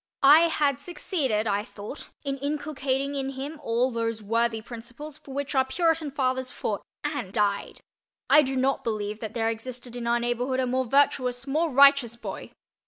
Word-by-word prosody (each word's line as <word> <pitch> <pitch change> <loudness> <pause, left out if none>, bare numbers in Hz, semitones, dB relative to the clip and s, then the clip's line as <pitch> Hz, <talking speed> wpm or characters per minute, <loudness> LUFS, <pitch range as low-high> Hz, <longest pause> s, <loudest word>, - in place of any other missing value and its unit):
I 305 +5 +8
had 285 -4 +1
succeeded, 285 - -1
I 205 -1 0
thought, 220 +4 -9
in 275 -1 -3
inculcating 280 -1 -2
in 270 -1 -3
him 285 +4 -6
all 245 0 +1
those 230 -1 -2
worthy 230 +2 0
principles 240 +7 -9
for 275 - -13
which 280 +1 -3
our 265 -1 +4
Puritan 325 +2 0
fathers 260 -2 -1
fought 210 -4 -3 0.2
and—aye—died. 210 -8 -1 0.5
I 300 - +7
do 270 -2 -2
not 265 +1 +1
believe 215 -2 -3
that 220 -1 -6
there 225 -1 +1
existed 240 +2 -6
in 240 -1 -4
our 235 0 +2
neighborhood 245 +2 -1
a 260 - +2
more 255 +1 0
virtuous, 250 -1 +2
more 310 +4 +1
righteous 275 -3 +5
boy. 235 - -7
260 Hz, 170 wpm, -26 LUFS, 230-280 Hz, 0.5 s, I